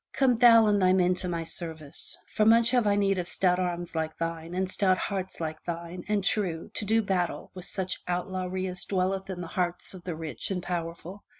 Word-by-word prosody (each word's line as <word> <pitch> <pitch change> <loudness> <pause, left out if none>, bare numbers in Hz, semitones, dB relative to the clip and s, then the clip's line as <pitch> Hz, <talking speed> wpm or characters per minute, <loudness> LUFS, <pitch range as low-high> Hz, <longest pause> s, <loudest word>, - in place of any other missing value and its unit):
Come 250 -4 +3
thou 230 -2 +8
and 205 -1 +3
thy 185 0 +5
men 180 -1 +4
to 180 - -3
my 170 -1 -2
service, 160 -3 -6 0.2
for 215 - +3
much 230 +2 +5
have 245 -4 +3
I 200 - +4
need 195 -2 +2
of 175 - -4
stout 180 -1 +2
arms 175 -2 -2
like 160 0 -2
thine, 165 +1 -4
and 190 0 0
stout 185 -2 +3
hearts 190 -2 -3
like 160 -1 -4
thine 170 +1 -5
and 210 -2 +1
true, 185 -5 -1
to - - -3
do 225 +2 +3
battle 185 -3 -1
with 185 -1 -8
such 190 -1 -3
out 180 0 -1
lawry 185 0 -3
as 180 -1 -3
dwelleth 190 0 -1
in 180 -2 -4
the - - -4
hearts 175 +1 -2
of 185 -2 -10
the 175 -3 -4
rich 155 -6 -5
and 180 -2 -2
powerful. 175 +2 -5
185 Hz, 220 wpm, -28 LUFS, 170-195 Hz, 0.2 s, thou